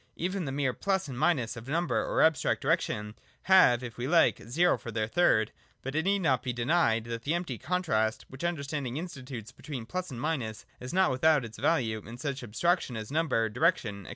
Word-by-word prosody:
Even 185 +1 -2
the 135 - -3
mere 135 -2 0
plus 190 +2 -1
and 135 - -6
minus 145 -8 +1
of 115 +1 -9
number 170 +5 0
or - - +2
abstract 160 -2 +2
direction 105 0 0 0.3
have, 180 -11 +5
it 120 -2 -7
we 120 +1 -3
like, 165 +2 +4
zero, 170 +8 +3
for - - -9
their 110 -1 -1
third: 110 -5 +2 0.3
but 135 - -4
it 160 +3 0
need 200 0 +2
not 130 -6 +2
be 125 - -2
denied 120 -2 +2
that 115 0 -5
the 150 +7 0
empty 165 - -4
contrast, 110 -12 0
which 130 +3 -10
understanding 140 -6 -2
institutes 130 - -7
between 130 -3 -7
plus 185 +8 -4
and 125 -4 -7
minus, 120 -7 -3
is 125 - -7
not 190 -2 +3
without 145 +1 +3
its 110 -1 -10
value 115 -10 +1
in 115 +3 -10
such 140 +1 -4
abstractions 125 - 0
as 110 +2 -6
number, 150 -8 +1
direction, 105 -2 0
&c. - - -10
135 Hz, 205 wpm, -29 LUFS, 115-165 Hz, 0.3 s, have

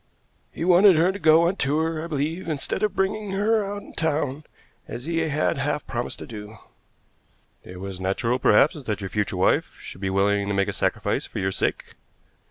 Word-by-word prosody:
"He 165 - -4
wanted 185 +1 +7
her 170 +4 +3
to 200 - -7
go 160 0 +5
on 190 +3 -1
tour, 155 +3 0
I - - -5
believe, 160 +4 -3
instead 150 -3 -2
of 215 - 0
bringing 195 +1 -1
her 215 +2 +2
out 205 +1 -5
in - - -14
town, 150 -2 -1 0.4
as 120 +3 -7
he 165 0 -2
had 155 -1 0
half 145 +1 -1
promised 120 0 -4
to - - -8
do." 105 -1 -9 1.1
"It 90 0 -10
was 95 -1 -6
natural 115 +7 0
perhaps 140 +7 +4
that 110 -6 -3
your 95 - -5
future 105 -3 -1
wife 90 - +1
should 95 - -10
be 95 - -1
willing 100 +1 +1
to 100 - -1
make 100 0 +1
a - - -3
sacrifice - - -1
for - - -9
your 95 0 0
sake." - - -2
145 Hz, 195 wpm, -24 LUFS, 105-170 Hz, 1.1 s, wanted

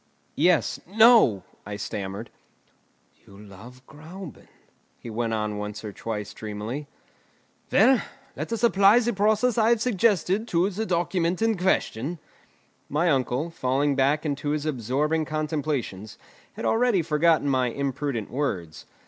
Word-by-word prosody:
"Yes; 170 +1 +2
no!" 220 - +5 0.2
I 105 - -6
stammered. 100 -1 -5 0.9
"You 100 - -16
love 105 +6 -14
Gräuben," 160 +2 -11 0.5
he 115 - -9
went 115 +1 -2
on 105 -1 -3
once 105 +1 -6
or 105 - -6
twice 105 -1 -5
dreamily. 110 +8 -6 0.8
"Well, 260 -2 +5 0.3
let - - -5
us 230 0 -3
apply 200 -1 +5
the 240 0 +1
process 215 +4 +2
I 220 0 +4
have 235 -1 +3
suggested 215 -2 +1
to 180 +2 +1
the 215 +3 -3
document 175 +1 0
in 225 -1 +2
question." 175 - -1 0.7
My 165 +4 +1
uncle, 135 +4 -1
falling 140 -1 0
back 140 +4 +1
into 145 0 -2
his 150 0 -1
absorbing 150 +4 -1
contemplations, 150 - -3 0.4
had - - -6
already 225 -6 +2
forgotten 160 -1 +2
my 130 -2 +2
imprudent 135 -2 -3
words. 95 - -3
150 Hz, 130 wpm, -25 LUFS, 120-190 Hz, 0.9 s, no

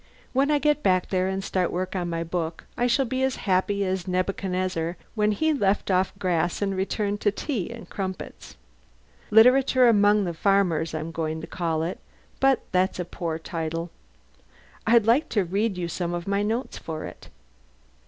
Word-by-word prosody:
When 270 +2 +2
I 300 - +4
get 295 0 +2
back 185 -5 +2
there 185 -1 +1
and 190 0 -2
start 185 -2 0
work 185 +2 -3
on 175 -2 -2
my 165 0 -2
book 165 -1 -3
I 245 - +1
shall 255 +3 +2
be 260 +2 -2
as 265 0 +1
happy 200 +1 +1
as 185 -1 -2
Nebuchadnezzar 185 -2 -1 0.2
when 210 -1 +2
he 315 +9 +1
left 200 -7 +1
off 185 0 +2
grass 175 -3 0
and 195 -1 -1
returned 205 +2 -1
to 205 - +3
tea 215 - -3
and 235 -1 -9
crumpets. 190 -2 -6 0.7
'Literature 255 +3 +6
Among 205 -2 +5
the 175 -2 -2
Farmers' 170 -4 +1
I'm 155 +1 -4
going 160 -1 -3
to - - -6
call 165 -3 -2
it, 170 +3 -4 0.4
but 270 -1 +3
that's 185 0 +1
a 180 - -3
poor 165 -2 -4
title. 165 0 -4 1.0
I'd 230 -2 +5
like 240 +8 +3
to 205 -4 +1
read 195 +3 -1
you 175 -1 -2
some 175 +1 -3
of 175 +1 -5
my 200 0 +1
notes 225 +5 -2
for 160 -1 -5
it." - - -10
190 Hz, 180 wpm, -25 LUFS, 175-215 Hz, 1.0 s, Literature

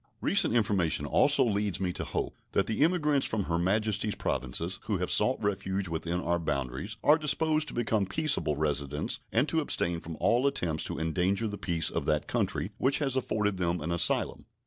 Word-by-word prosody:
Recent - - +3
information 100 -8 +1
also - - +3
leads 105 -4 -1
me 90 -2 -1
to - - -4
hope - - -3 0.2
that 100 - +2
the 110 +5 +1
emigrants 150 -5 +2
from 110 -2 -1
Her 85 -2 -1
Majesty's 105 +3 0
Provinces 75 +9 -2
who 105 -3 0
have 90 0 -2
sought 125 +5 +4
refuge 95 -1 -1
within 85 +1 -3
our 85 0 0
boundaries 70 - -3
are 150 +2 +5
disposed 155 0 +1
to - - -7
become 110 -4 0
peaceable 150 - +1
residents 75 -1 -2
and 120 +6 +2
to 160 - +1
abstain 85 - 0
from 80 0 -8
all 120 +4 +2
attempts 80 - -1
to - - -4
endanger 90 +7 0
the 105 -1 -6
peace 85 -3 0
of - - -3
that 75 -1 +1
country - - -2
which 135 +2 +2
has 135 -4 0
afforded 105 -6 -1
them 85 -1 0
an 80 +3 -4
asylum. 85 0 +1
100 Hz, 190 wpm, -29 LUFS, 85-115 Hz, 0.2 s, are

